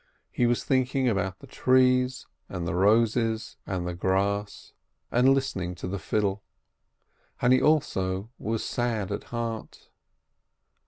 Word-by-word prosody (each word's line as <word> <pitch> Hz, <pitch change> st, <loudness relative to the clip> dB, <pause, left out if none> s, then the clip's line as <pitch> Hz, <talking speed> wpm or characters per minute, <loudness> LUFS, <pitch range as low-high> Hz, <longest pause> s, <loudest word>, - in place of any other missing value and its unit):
He 120 Hz, -, +2 dB
was 120 Hz, 0 st, +1 dB
thinking 130 Hz, 0 st, +1 dB
about 100 Hz, -4 st, 0 dB
the -, -, -13 dB
trees 130 Hz, -1 st, +2 dB, 0.2 s
and 85 Hz, -2 st, -4 dB
the -, -, -1 dB
roses 110 Hz, +4 st, +2 dB
and 90 Hz, -2 st, -2 dB
the 90 Hz, -, -3 dB
grass, 100 Hz, +3 st, -1 dB, 0.4 s
and 130 Hz, +3 st, +5 dB
listening 95 Hz, -11 st, -2 dB
to 90 Hz, -, -6 dB
the 100 Hz, +2 st, -3 dB
fiddle. 100 Hz, -1 st, -1 dB, 1.0 s
And 125 Hz, +1 st, +4 dB
he 130 Hz, -, +4 dB
also 100 Hz, -9 st, +1 dB
was 110 Hz, 0 st, -2 dB
sad 115 Hz, -5 st, -1 dB
at -, -, -4 dB
heart. 115 Hz, -2 st, -6 dB
110 Hz, 130 wpm, -27 LUFS, 95-125 Hz, 1.0 s, and